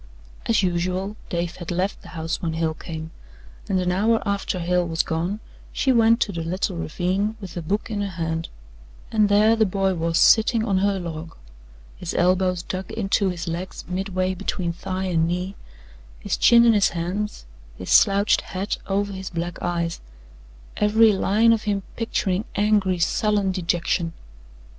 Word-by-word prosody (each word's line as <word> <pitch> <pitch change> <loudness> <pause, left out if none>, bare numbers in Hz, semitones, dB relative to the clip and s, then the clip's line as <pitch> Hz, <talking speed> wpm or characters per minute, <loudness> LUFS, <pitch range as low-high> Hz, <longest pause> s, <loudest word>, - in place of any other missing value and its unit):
As 220 -3 +3
usual, 185 +3 -1
Dave 170 -1 -3
had 175 -2 -7
left 185 +3 -1
the - - -14
house 160 +1 -3
when 165 -2 -2
Hale 160 0 0
came, 160 0 -7 0.6
and 190 - +2
an 180 0 0
hour 220 +5 +2
after 200 -1 -1
Hale 180 0 0
was 165 0 0
gone 175 +6 -2 0.3
she 265 - +1
went 230 -1 +4
to 205 - +1
the 170 -3 -4
little 185 +3 -2
ravine 185 +6 -1
with 195 -4 -9
a 175 - -3
book 205 +7 -2
in 205 -1 -2
her 200 - -2
hand, 165 0 -3 0.6
and 215 -2 +3
there 210 +2 +5
the 225 - +3
boy 195 0 0
was 165 -1 0
sitting 220 +4 +5
on 195 -4 +1
her 200 0 +1
log, 165 -2 -6 0.6
his 175 - -5
elbows 180 0 +2
dug 185 0 -5
into 200 -2 +1
his 175 -1 -5
legs 175 +3 -5
midway 185 0 -1
between 175 -1 -3
thigh 185 +2 -4
and 165 -3 +1
knee, 180 +3 -3 0.6
his - - -2
chin 235 0 +6
in 230 - +6
his 205 -2 +4
hands, 180 - -4 0.3
his 90 - -6
slouched 200 +1 +5
hat 190 +3 -4
over 200 +1 -1
his 190 -1 -6
black 170 0 -4
eyes 170 -1 -2 0.8
every 215 +1 +5
line 215 +4 +3
of 220 -1 -2
him 200 -2 -1
picturing 205 -4 -1
angry, 205 -3 +2
sullen 205 +3 +1
dejection. 170 -1 -1
185 Hz, 165 wpm, -23 LUFS, 170-205 Hz, 0.8 s, chin